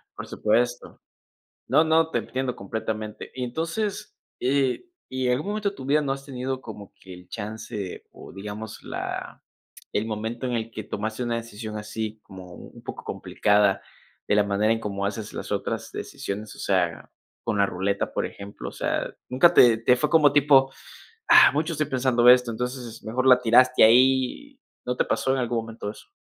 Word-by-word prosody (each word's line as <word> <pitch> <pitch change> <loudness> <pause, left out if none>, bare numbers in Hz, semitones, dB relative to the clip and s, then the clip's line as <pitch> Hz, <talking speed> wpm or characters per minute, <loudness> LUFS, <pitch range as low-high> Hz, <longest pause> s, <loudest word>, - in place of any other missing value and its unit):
Por - - -7
supuesto. - - -1 0.7
No, 160 - +5
no, 160 0 +3
te - - 0
entiendo 130 -1 -3
completamente. 110 +1 -5
Y 130 -1 -3
entonces, 165 - -3 0.2
eh, 135 - +1 0.2
¿y 130 -1 -2
en 125 - +3
algún 150 +10 -1
momento 210 -1 -1
de - - -14
tu 130 - -8
vida 145 +2 +3
no 135 -1 -1
has 135 0 -6
tenido 130 -1 -4
como 105 -4 -10
que 95 -1 -11
el 90 0 -15
chance, 110 -2 -6
o, - - -12
digamos 105 +2 -7
la - - -5 0.5
el 105 +2 0
momento 110 +3 -4
en 125 - -2
el 115 0 -2
que 110 -2 -7
tomaste 110 +4 -4
una 120 -1 -1
decisión 110 -2 -6
así 110 +1 -5
como 95 -1 -11
un - - -13
poco - - -8
complicada 100 -2 +1 0.4
de - - +2
la 105 - +5
manera 105 +2 +2
en 115 - -1
cómo 100 -2 -3
haces 105 +1 -4
las - - -5
otras - - -3
decisiones? 105 +1 -6
O - - -16
sea, 90 -4 -1 0.3
con 105 - -1
la 100 - +4
ruleta, 100 +2 -2
por - - -1
ejemplo, 100 0 -7
o - - -16
sea, - - -2
nunca 130 +7 +5
te 120 -2 +7
te 125 +2 +3
fue 150 +4 0
como 150 -4 +5
tipo, 135 -2 +5 0.6
ah, 335 0 +8
mucho 160 +3 0
estoy 155 -1 -1
pensando 125 -3 +3
esto, 125 -1 +6
entonces 125 0 -5
mejor 125 +4 -1
la 125 -1 +7
tiraste 125 +2 +5
ahí. 130 - +3 0.3
¿No 125 0 -1
te - - +1
pasó 130 - 0
en 135 - 0
algún 120 -2 0
momento 115 -2 -6
eso? - - -16
120 Hz, 185 wpm, -25 LUFS, 105-135 Hz, 0.7 s, ah